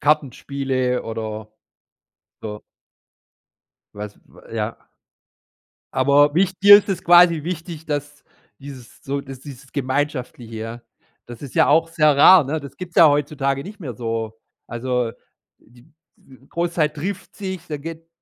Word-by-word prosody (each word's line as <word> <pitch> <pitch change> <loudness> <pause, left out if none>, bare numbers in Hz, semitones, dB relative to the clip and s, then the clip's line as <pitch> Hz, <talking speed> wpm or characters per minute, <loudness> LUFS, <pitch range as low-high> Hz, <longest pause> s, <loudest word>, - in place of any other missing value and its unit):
Kartenspiele 135 -3 0
oder 110 -1 -6 0.9
so. 105 -1 -7 1.3
Was 105 0 -8 0.3
ja. - - -3 1.2
Aber 145 +3 +4
wich 190 +1 +1
dir 205 +1 +10
ist 205 - -3
es 185 -2 -2
quasi 175 -2 +6
wichtig, 165 -1 -6
dass 145 -1 -5 0.4
dieses 135 -4 -12
so 140 +1 -3
dass 135 -2 -10
dieses 135 -1 -12
Gemeinschaftliche 130 -4 -3
ja. 115 +2 -7 0.4
Das 120 -1 -11
ist 140 -4 -9
ja - - +4
auch 165 +3 +3
sehr 155 -3 +3
rar, 175 +4 +8
ne? 155 +3 -2
Das 140 -1 -11
gibt 180 -1 -8
es - - -25
ja 165 - +8
heutzutage 140 -1 0
nicht 200 +1 -11
mehr 130 -6 -5
so, 115 -1 -4 0.3
also, 125 0 -2 0.5
die 120 +6 -22 0.2
w 130 0 -20
Großzeit 170 -3 -1
trifft 180 +6 -5
sich, 190 -4 -6
dann 150 -2 -5
geht 165 +1 -8
140 Hz, 140 wpm, -21 LUFS, 125-165 Hz, 1.3 s, dir